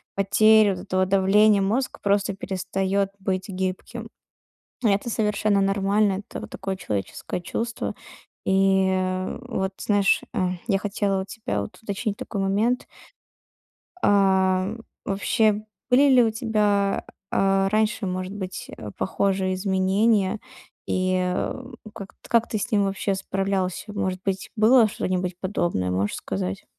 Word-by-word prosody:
потери 215 +2 +5
вот 190 - -4
этого 185 -1 0
давления, 200 +2 +4
мозг 230 +7 -1
просто 200 0 +1
перестаёт 195 +1 -1
быть 190 -1 -2
гибким. 195 +4 -4 0.8
Это 205 +3 +2
совершенно 210 -2 +1
нормально, 195 0 +2
это - - -6
вот - - -8
такое 190 0 -4
человеческое 105 - -4
чувство. 230 +6 -3 0.5
И, 190 0 +3
а, 185 0 -1
вот, 190 -6 -2
знаешь, 205 -2 +3
а, 185 -1 0 0.2
я 200 -4 +3
хотела 200 -1 -1
у - - -5
тебя, 190 - -3
вот, 100 - -8
уточнить 210 0 -3
такой 200 - -4
момент. 210 +6 +1 1.2
Ам, 190 +1 +3 0.3
вообще 210 +2 +1 0.3
были 275 +3 +6
ли 255 -2 +7
у 225 - +2
тебя, 210 -3 +1 0.3
а, 195 0 +2
раньше, 215 0 +1
может 185 +1 -3
быть, 190 -2 -6
э, 105 -2 -7
похожие 190 -1 0
изменения? 195 +2 +2 0.5
И, 185 0 +1
а, 185 +7 -2 0.2
у 215 - -10
как 200 -2 -9
т - - -18
как 235 0 +3
ты 215 - -2
с - - -3
ним 205 -2 +3
вообще 195 0 -1
справлялся? 195 +1 -2
Может 185 -2 -2
быть, 195 -1 -2
было 225 +1 +6
что-нибудь 185 -3 -2
подобное? 175 - -1
Можешь 95 +3 -1
сказать? 95 0 -4
195 Hz, 135 wpm, -24 LUFS, 185-210 Hz, 1.2 s, ли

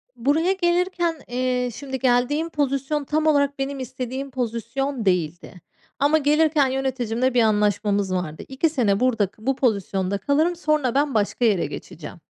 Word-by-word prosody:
Buraya 290 +9 +1
gelirken, 345 -3 0
eee, 250 0 -1
şimdi 265 +1 -5
geldiğim 260 +6 +1
pozisyon 285 0 -1
tam 305 +3 -1
olarak 285 -2 +2
benim 275 0 -3
istediğim 260 +1 -5
pozisyon 245 +1 -3
değildi 175 -1 -1 0.4
ama 290 +3 +4
gelirken 300 -1 +3
yöneticimle 260 -2 -1
bir 245 - +4
anlaşmamız 205 -2 +1
vardı. 175 -4 -3
2 270 +5 0
sene 220 -9 +1
burada 235 -5 +2
k 215 +4 -18
bu 270 - +1
pozisyonda 200 -6 0
kalırım. 295 - +1
Sonra 305 -6 0
ben 285 0 +2
başka 215 +3 0
yere 200 -6 +2
geçeceğim 150 +2 -8
260 Hz, 145 wpm, -23 LUFS, 220-290 Hz, 0.4 s, ama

